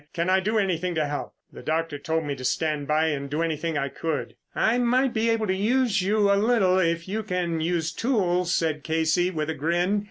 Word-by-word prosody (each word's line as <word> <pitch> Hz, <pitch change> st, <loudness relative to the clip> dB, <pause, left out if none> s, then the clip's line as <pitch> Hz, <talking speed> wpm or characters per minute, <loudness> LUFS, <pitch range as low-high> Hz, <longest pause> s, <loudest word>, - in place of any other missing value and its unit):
"Can 170 Hz, +2 st, 0 dB
I 190 Hz, -, +4 dB
do 215 Hz, +4 st, 0 dB
anything 180 Hz, -3 st, 0 dB
to 155 Hz, -1 st, +1 dB
help? 145 Hz, 0 st, -5 dB, 0.2 s
The -, -, -10 dB
doctor 160 Hz, -2 st, -2 dB
told 160 Hz, +3 st, -1 dB
me 145 Hz, -2 st, -3 dB
to 130 Hz, -, -9 dB
stand 150 Hz, +1 st, -1 dB
by 155 Hz, +1 st, +2 dB
and 140 Hz, -2 st, -3 dB
do 150 Hz, +4 st, -1 dB
anything 160 Hz, 0 st, -2 dB
I 140 Hz, -1 st, 0 dB
could." 160 Hz, +3 st, -4 dB, 0.2 s
"I 235 Hz, +3 st, +2 dB
might 250 Hz, +2 st, +2 dB
be 225 Hz, +1 st, +1 dB
able 225 Hz, -1 st, +1 dB
to 190 Hz, -, 0 dB
use 225 Hz, +1 st, +1 dB
you 205 Hz, +1 st, +2 dB
a -, -, +2 dB
little 200 Hz, -4 st, +3 dB
if 170 Hz, -1 st, 0 dB
you 215 Hz, +3 st, -2 dB
can 180 Hz, -5 st, -2 dB
use 165 Hz, -1 st, 0 dB
tools," 180 Hz, -7 st, 0 dB
said 155 Hz, -3 st, 0 dB
Casey 160 Hz, +2 st, +1 dB
with 160 Hz, -3 st, -2 dB
a -, -, -2 dB
grin. 175 Hz, +7 st, 0 dB
175 Hz, 220 wpm, -25 LUFS, 160-205 Hz, 0.2 s, I